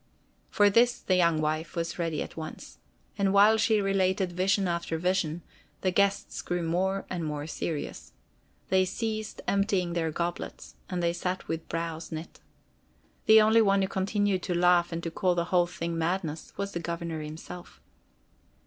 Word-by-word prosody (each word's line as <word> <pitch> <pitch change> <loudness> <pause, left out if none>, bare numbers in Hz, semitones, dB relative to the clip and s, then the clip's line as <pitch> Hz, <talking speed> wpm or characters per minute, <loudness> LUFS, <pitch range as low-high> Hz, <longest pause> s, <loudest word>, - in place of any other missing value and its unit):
For 205 -1 +4
this 240 +3 +4
the 185 - +1
young 170 -3 +3
wife 155 +1 -2
was 170 +1 -3
ready 165 -2 -1
at - - -11
once. 160 -1 -8 0.4
And 195 -1 +3
while 205 +3 +6
she 220 -1 +3
related 190 -2 +1
vision 190 +2 +1
after 170 -1 -2
vision, 175 -2 0 0.4
the 185 - +1
guests 200 +1 +1
grew 175 -1 -2
more 190 +4 0
and 175 -2 -4
more 150 -1 -3
serious. 160 -1 -5 0.6
They 190 0 +4
ceased 215 +2 -3
emptying 195 -3 +1
their 165 -2 0
goblets, 170 +2 -4 0.2
and 180 -2 -2
they 170 0 +2
sat 180 +1 -3
with 165 0 -4
brows 165 -1 -4
knit. 160 +1 -7 0.9
The 220 0 +9
only 220 +1 +5
one 195 -2 +3
who - - +1
continued 195 0 0
to 180 - -2
laugh 175 0 +4
and 165 0 -4
to 165 - -3
call 180 +1 +1
the 170 -1 0
whole 175 -1 +4
thing 170 -1 -4
madness, 165 -2 -2
was 200 0 -3
the 170 - -3
Governor 170 -1 -4
himself. 155 +4 -9
180 Hz, 165 wpm, -28 LUFS, 165-195 Hz, 0.9 s, The